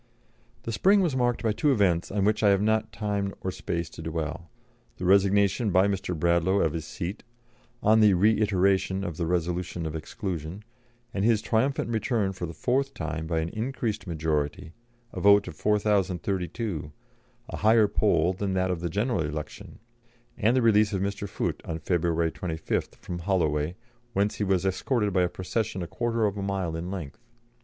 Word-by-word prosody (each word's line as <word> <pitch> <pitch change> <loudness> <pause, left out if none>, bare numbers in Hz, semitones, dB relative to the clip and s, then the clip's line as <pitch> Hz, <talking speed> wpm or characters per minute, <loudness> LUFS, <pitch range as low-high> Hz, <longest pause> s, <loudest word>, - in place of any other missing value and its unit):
The 115 - -4
spring 195 - +4
was 165 -8 +1
marked 120 -2 0
by 110 - +2
two 145 +7 +2
events 95 -8 +2
on 100 -1 0
which 105 +1 +2
I 105 - +5
have 100 0 +3
not 110 0 +1
time 100 -2 -2
or 95 - -2
space 85 -2 -3
to - - -9
dwell 80 +1 -4 0.5
the 90 - -4
resignation 100 +3 +3
by 95 +1 +4
Mr. 95 -3 -2
Bradlaugh 85 +4 +2
of 80 - +1
his 80 -2 -4
seat, 90 +5 -5 0.6
on 110 +1 +5
the 105 -3 +6
reiteration 95 -1 +2
of 85 -5 -4
the 85 - -1
resolution 90 0 -2
of 80 0 -4
exclusion, 90 0 -5 0.5
and 95 - -1
his 110 -1 +4
triumphant 120 +3 0
return 110 -3 0
for 90 -2 -5
the 85 - -7
fourth 135 +2 0
time 80 0 -4
by 80 -1 0
an 80 - -3
increased 115 -1 -3
majority, 80 -1 -2 0.4
a - - -5
vote 100 0 +5
of 85 - -7
4,032, 100 -3 -1 0.6
a - - -5
higher 110 0 +5
poll 95 -4 +2
than 95 +1 -2
that 95 0 +1
of 85 -2 -3
the 85 - -2
general 105 +3 0
election; 75 +3 -6 0.6
and 115 +4 +2
the 125 - +2
release 105 -2 +4
of 95 - -1
Mr. 100 0 -3
Foote, - - -3
on 80 - -4
February 85 -1 0
25th, 80 -3 -3
from 85 -1 -7
Holloway, 85 -3 0 0.4
whence 100 +1 +1
he - - -1
was 95 -2 +1
escorted 105 +2 0
by 90 - +3
a 90 - +2
procession 95 +1 -3
a - - -5
quarter 115 +3 -1
of 105 -1 -1
a - - -2
mile 95 -4 -2
in 85 +2 -4
length. 85 -8 -6
95 Hz, 180 wpm, -27 LUFS, 85-105 Hz, 0.6 s, the